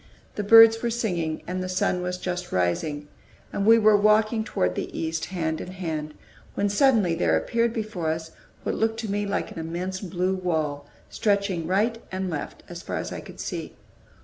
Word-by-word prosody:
The - - -3
birds 225 +1 +8
were 235 - 0
singing, 180 -9 -2
and 185 +1 -3
the 185 - -4
sun 185 0 0
was 180 0 -3
just 180 -1 -4
rising, 145 - -1 0.5
and 200 +1 -1
we 225 +1 +8
were 215 -1 +5
walking 215 +2 +3
toward 90 - 0
the - - -4
east, 160 0 -2
hand 160 -4 -2
in 185 - -7
hand, 155 -5 -4 0.4
when 205 - +1
suddenly 210 -5 +3
there 165 - +2
appeared 235 0 0
before 215 -8 -3
us 160 0 -3 0.3
what - - -1
looked 225 0 0
to 220 -3 -4
me 205 0 -1
like 200 - -2
an - - -7
immense 175 +4 -4
blue 185 -1 -1
wall, 155 -6 -2 0.2
stretching 200 -5 0
right 215 +5 +1
and 190 -1 -3
left 150 -3 -5
as - - -8
far - - -5
as - - -4
I - - -5
could - - -12
see. - - -5
185 Hz, 190 wpm, -25 LUFS, 165-215 Hz, 0.5 s, birds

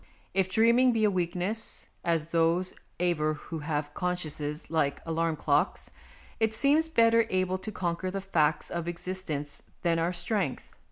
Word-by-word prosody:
If 190 -1 +1
dreaming 235 +5 +4
be 225 -1 +1
a 210 - +4
weakness, 185 +4 -2 0.2
as 165 -1 0
those 170 +2 +2 0.3
aver 155 -3 +1
who 160 +2 -7
have 150 -1 -3
consciences 155 -4 -3
like 145 -4 +1
alarm 165 0 0
clocks, 145 -1 0 0.5
it 220 -1 +2
seems 300 +6 +3
better 230 -4 +4
able 185 0 0
to 215 - -6
conquer 180 -1 -2
the 195 +1 -3
facts 160 -6 +1
of 170 -1 -3
existence 170 -5 -4 0.2
than 170 -1 +2
our 165 +2 +1
strength. 180 - -1
175 Hz, 150 wpm, -29 LUFS, 160-195 Hz, 0.5 s, dreaming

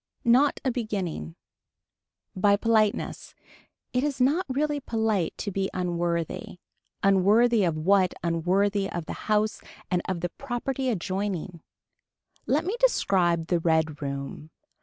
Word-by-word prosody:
Not 255 +5 +4
a 260 - +2
beginning. 190 - -4 1.0
By 200 +2 +4
politeness. 215 -1 0 0.6
It 250 +1 +1
is 285 -2 -2
not 290 +9 +2
really 290 +2 0
polite 220 - -1
to 200 - -4
be 195 0 -1
unworthy. 175 -1 -2 0.5
Unworthy 205 +4 +4
of 165 -3 0
what 185 +3 +3
unworthy 195 +4 +1
of 170 -2 -4
the - - -5 0.2
house 215 0 +1 0.3
and 180 -1 +2
of 180 -3 -2
the 175 - -1
property 265 0 -2
adjoining. 185 -4 -3 0.9
Let 300 +4 +1
me 390 +5 -1
describe 180 - +2
the 175 0 +1
red 160 -2 +1
room. 140 +2 -5
195 Hz, 125 wpm, -26 LUFS, 170-235 Hz, 1.0 s, Not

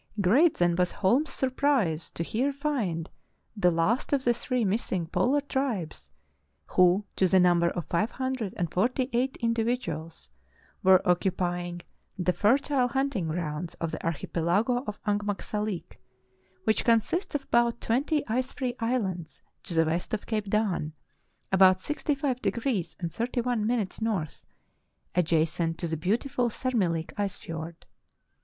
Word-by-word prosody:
Great 255 - +4
then 175 -1 +3
was 180 -1 +2
Holm's 255 +9 +2
surprise 255 - 0
to 170 - -4
here 250 +10 0
find 245 - -2 0.5
the 190 -4 +3
last 175 - +1
of 275 -2 +2
the 240 - +3
three 240 0 -1
missing 190 -3 -1
polar 195 - +1
tribes, 215 - -3 0.6
who 185 +3 +3
to 190 - +3
the 190 +1 +4
number 175 -1 +4
of 175 -3 -4
five 210 +6 0
hundred 260 -6 -3
and 170 -2 -1
forty 250 +7 0
eight 255 +3 0
individuals 225 - -2 0.5
were 185 -1 +5
occupying 175 -1 0 0.3
the 180 0 +1
fertile 260 +5 +2
hunting 265 -8 -1
grounds 160 0 -3
of 165 -1 -3
the - - -6
archi 165 -4 -2
pelago 205 +10 +1
of 210 - -5
Angmagsalik, 205 -1 -2 0.6
which 220 +2 +2
consists 235 - +1
of 280 - -1
about 235 -2 +2
twenty 285 +6 0
ice 255 +3 -1
free 255 -3 -2
islands 195 -9 -2 0.2
to 170 - -5
the 165 0 +4
west 170 +6 -1
of 210 - -7
Cape 215 -3 -2
Dan, 195 -7 0 0.6
about 190 -1 +6
65° 265 - -1 0.2
31 240 -2 -1
N., 225 -6 +1 1.3
adjacent 165 -1 +1
to 170 - -2
the 160 - -2
beautiful 240 - 0
Sermihk 195 -10 -1
ice 200 -2 -1
fiord. 165 0 -7
205 Hz, 135 wpm, -28 LUFS, 175-250 Hz, 1.3 s, about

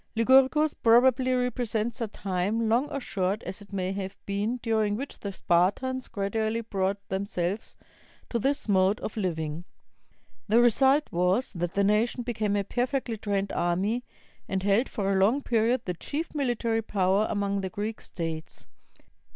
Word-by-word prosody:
Lycurgus 265 +6 +4
probably 255 +2 +4
represents 245 -1 -1
a 230 - 0
time, 200 +3 -1
long 240 +6 +2
or 280 - -3
short 195 -3 -2
as 195 - -6
it 205 - -14
may 190 -1 -2
have 195 0 -5
been, 205 +5 -1
during 220 -3 +1
which 275 +6 -6
the 200 - -4
Spartans 200 +9 +1
gradually 220 +3 -1
brought 195 -3 -1
themselves 190 0 -2 0.6
to 235 - 0
this 275 +3 0
mode 195 0 +3
of - - -4
Uving. 165 -5 -3 0.8
The 220 +2 +4
result 265 +5 +4
was 180 +9 +1
that 175 -2 -3
the 200 - +3
nation 215 +4 +2
became 220 -4 -1
a 200 - +1
perfectly 245 +2 -1
trained 200 -2 -2
army; 195 +8 0 0.5
and 190 -1 -1
held 205 +6 +2
for 200 -4 -1
a 190 - +2
long 255 +8 +2
period 235 +1 +2
the 180 - -2
chief 295 - -5
military 240 -5 0
power 200 -1 +1
among 200 -1 -1
the 190 - -3
Greek 210 +4 -4
states. 165 -2 -6
215 Hz, 155 wpm, -27 LUFS, 195-240 Hz, 0.8 s, Lycurgus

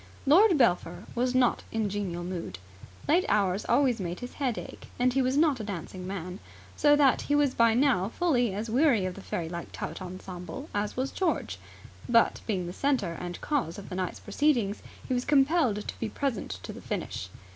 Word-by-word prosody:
Lord 350 +5 +6
Belpher 230 -9 +1
was 250 +1 0
not 250 -2 +3
in 220 -2 0
genial 190 -4 -3
mood. 175 - -5 0.5
Late 335 +5 +4
hours 200 -1 +1
always 245 -1 +3
made 180 +1 -4
his 245 - -7
head 260 -6 -1
ache, - - -8
and 250 0 +2
he 270 - +2
was 260 +2 +1
not 300 -4 +3
a - - -4
dancing 185 -2 -6
man; 185 0 -5 0.4
so 290 -1 +5
that 280 -3 +4
he 290 - 0
was 290 -3 +3
by 230 -1 +4
now 245 -8 +3
fully 245 - +1
as 210 +4 -4
weary 240 -4 +3
of 185 - -2
the 200 - -10
fairylike 170 -1 -5
tout - - -6
ensemble 185 - -7
as 205 +2 -2
was 265 +1 -1
George. 365 -4 -1 0.5
But, 230 -1 +4
being 190 -5 -1
the 175 - -6
centre 245 -10 0
and 175 0 -6
cause 265 - -1
of 200 - -9
the 180 - -5
night's 185 -1 -3
proceedings, 225 -3 +1 0.3
he - - -1
was 245 0 0
compelled 275 -6 +2
to - - -6
be 225 - -2
present 265 -1 -2
to - - -6
the - - -10
finish. 90 - -4
230 Hz, 195 wpm, -28 LUFS, 185-275 Hz, 0.5 s, Lord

